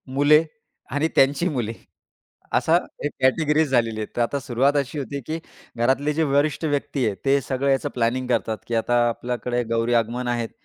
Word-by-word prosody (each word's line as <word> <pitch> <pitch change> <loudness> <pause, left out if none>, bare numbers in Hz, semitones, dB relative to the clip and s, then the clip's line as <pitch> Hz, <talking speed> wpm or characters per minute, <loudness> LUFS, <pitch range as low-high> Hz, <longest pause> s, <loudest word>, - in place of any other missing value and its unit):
मुले 145 +4 +5 0.5
आणि 145 +3 +1
त्यांची 140 +6 +3
मुले 120 -6 -2 0.8
असा 165 +2 +4 0.3
एक 145 - -1
कॅटेगरीज 150 +3 +2
झालेली 115 -4 +1
आहेत. 105 - -3
तर - - +2
आता 130 +4 0
सुरुवात 135 +3 +1
अशी 140 +1 -2
होती 140 +1 -4
की 160 +1 -3 0.4
घरातले 135 +5 +1
जे 160 +2 +1
वरिष्ठ 145 +2 +1
व्यक्ती 145 -3 -1
आहेत. 105 -3 0
ते 140 +1 +4
सगळं 135 +1 -1
याचं 135 - 0
प्लॅनिंग 125 +2 0
करतात 110 -3 0
की 120 - -2
आता 120 +2 +1
आपल्याकडे 120 +1 -2
गौरी 115 +1 +1
आगमन 120 +2 0
आहेत. 120 -2 -1
130 Hz, 175 wpm, -23 LUFS, 120-145 Hz, 0.8 s, मुले